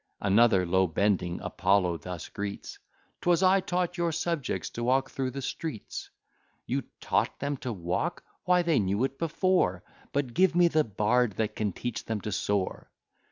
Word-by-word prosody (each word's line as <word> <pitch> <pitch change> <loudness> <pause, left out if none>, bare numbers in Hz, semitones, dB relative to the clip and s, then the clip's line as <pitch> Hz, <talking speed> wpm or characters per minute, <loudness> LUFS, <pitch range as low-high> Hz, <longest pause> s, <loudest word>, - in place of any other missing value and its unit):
Another, 100 -1 +4
low 95 +2 +3
bending, 90 0 0
Apollo 95 -3 +1
thus 90 +2 -7
greets, 100 -1 -6 0.4
"'Twas 175 +1 +3
I 190 +1 +6
taught 180 -1 -2
your 170 -1 +1
subjects 165 -3 -2
to 120 - -5
walk 130 +2 +2
through 130 -1 -2
the 135 +1 -6
streets." 135 -5 -5 0.6
You - - -2
taught - - 0
them 140 +1 -1
to 125 -1 -4
walk! 90 -3 -2 0.2
why, 180 -1 +4
they 165 -4 +3
knew 100 +3 +1
it 135 0 -2
before; 165 - +1 0.3
But 140 -4 -1
give 185 +2 +3
me 175 -1 +5
the 155 -1 +3
bard 110 +2 +1
that 110 +2 -2
can 105 -2 -1
teach 120 +4 -4
them 110 -1 -2
to 105 - -4
soar. 100 -1 -1
120 Hz, 165 wpm, -28 LUFS, 100-165 Hz, 0.6 s, I